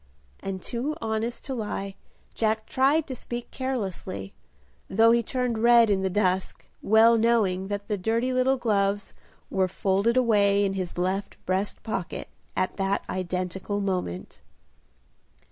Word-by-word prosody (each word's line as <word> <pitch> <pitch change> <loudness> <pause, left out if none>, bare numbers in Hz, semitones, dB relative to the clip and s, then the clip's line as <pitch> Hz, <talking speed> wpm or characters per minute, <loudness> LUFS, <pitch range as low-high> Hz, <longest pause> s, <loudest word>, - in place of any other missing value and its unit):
and 190 -1 -5
too 260 +6 -3
honest 225 -1 -3
to 270 - -3
lie, 210 -4 -4 0.4
Jack 220 -1 0
tried 280 +4 +2
to 260 - -6
speak 240 0 -6
carelessly, 195 - -4 0.6
though 225 +4 +5
he 235 0 +4
turned 245 0 -2
red 235 -1 +6
in 195 -1 +2
the 190 - 0
dusk, 185 -1 0 0.2
well 225 +2 +6
knowing 210 -5 +2
that 205 0 -4
the 210 -3 -2
dirty 230 +6 0
little 255 +1 +2
gloves 205 -4 0 0.4
were 190 -1 +2
folded 195 +5 +1
away 205 -4 +4
in 195 - 0
his 185 -3 -4
left 185 +3 -2
breast 190 +2 -1
pocket 195 -6 -4 0.3
at 185 - -1
that 195 0 0
identical 185 +2 -2
moment. 180 - -3
205 Hz, 140 wpm, -26 LUFS, 190-235 Hz, 0.6 s, red